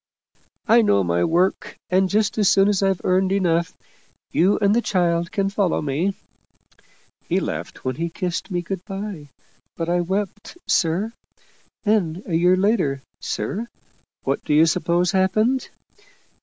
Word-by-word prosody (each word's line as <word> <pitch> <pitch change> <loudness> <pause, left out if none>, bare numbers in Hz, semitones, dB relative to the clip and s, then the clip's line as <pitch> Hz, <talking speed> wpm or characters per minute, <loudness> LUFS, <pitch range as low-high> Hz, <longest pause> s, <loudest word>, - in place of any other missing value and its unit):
I 230 +2 +6
know 100 - +3
my 85 0 +1
work, 180 +3 0
and 185 +1 +3
just 215 +2 +1
as 205 - +4
soon 195 0 +4
as 205 -2 +1
I've 195 -2 +1
earned 185 +1 +2
enough, 170 -4 0 0.5
you 190 +5 +3
and 205 0 +2
the 240 - +3
child 170 -5 0
can 195 -1 0
follow 195 -3 +1
me.' 155 +7 -1 1.1
He - - +2
laughed - - -5
when 130 -1 -2
he 170 +1 -2
kissed 180 +2 -4
me 175 -2 -2
good 185 +1 -5
by, 195 -7 -6 0.5
but 165 0 -2
I 175 0 +2
wept, 200 - -4
sir. 185 +7 +1 0.7
Then 195 -5 0
a 175 - -5
year 180 +3 +4
later, 185 - +1 0.2
sir, 225 +4 -3 0.6
what - - -1
do 150 - +1
you 155 +2 +6
suppose 175 +1 +1
happened? 215 +7 +1
185 Hz, 150 wpm, -22 LUFS, 170-200 Hz, 1.1 s, I